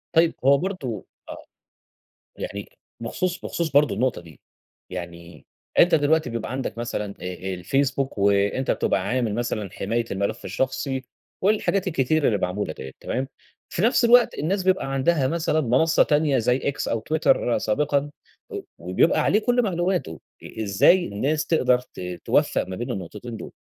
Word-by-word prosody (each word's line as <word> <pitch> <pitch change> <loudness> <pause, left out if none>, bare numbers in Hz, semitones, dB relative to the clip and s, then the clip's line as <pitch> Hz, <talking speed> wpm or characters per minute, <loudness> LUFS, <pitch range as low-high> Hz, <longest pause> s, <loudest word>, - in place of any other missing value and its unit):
طيب 165 0 +5
هو 140 0 +6
برضه 140 - -4 0.2
آه. - - -9 0.9
يعني - - -6 0.3
بخصوص 180 +9 -2
بخصوص 165 -4 -2
برضه 145 -6 +4
النقطة 125 -5 0
دي 80 -4 -16 0.5
يعني 85 -2 -8 0.3
أنتَ 175 - +6
دلوقتي 155 -2 +2
بيبقى 115 0 -4
عندك 130 -3 -4
مثلًا 105 -4 -3
أ 90 0 -4 0.2
الفيسبوك 135 +7 -1
وأنتَ 100 +5 +2
بتبقى 95 - +1
عامل 120 -3 0
مثلًا 110 -4 -2
حماية 115 +4 -2
الملف 100 +4 -2
الشخصي 130 0 -2 0.4
والحاجات 200 -1 +2
الكتير 155 -1 +1
اللي 105 - +2
معمولة 90 -2 -2
دِيَّة 65 0 -8
تمام؟ 130 +1 -2 0.5
في 170 - -1
نفس 235 +1 +4
الوقت 240 0 +6
الناس 185 +6 -1
بيبقى 185 -8 +1
عندها 135 0 +2
مثلًا 160 -1 0
منصة 135 +5 +3
تانية 150 -3 +2
زي 125 +3 +2
X 140 - -2
أو 115 -1 -1
Twitter 135 -6 +2
سابقًا، 145 +5 0 0.4
و - - -4 0.2
وبيبقى 90 - +2
عليه 210 - +3
كل 245 +2 +2
معلوماته، 175 - -1 0.2
إ 110 - -6
إزاي 110 - +4
الناس 145 +10 -1
تقدر 125 -6 +3
ت 125 - -14 0.3
توفَّق - - +2
ما 95 - -5
بين 120 +4 -4
النقطتين 105 +4 -6
دول؟ - - -9
130 Hz, 150 wpm, -24 LUFS, 105-160 Hz, 0.9 s, هو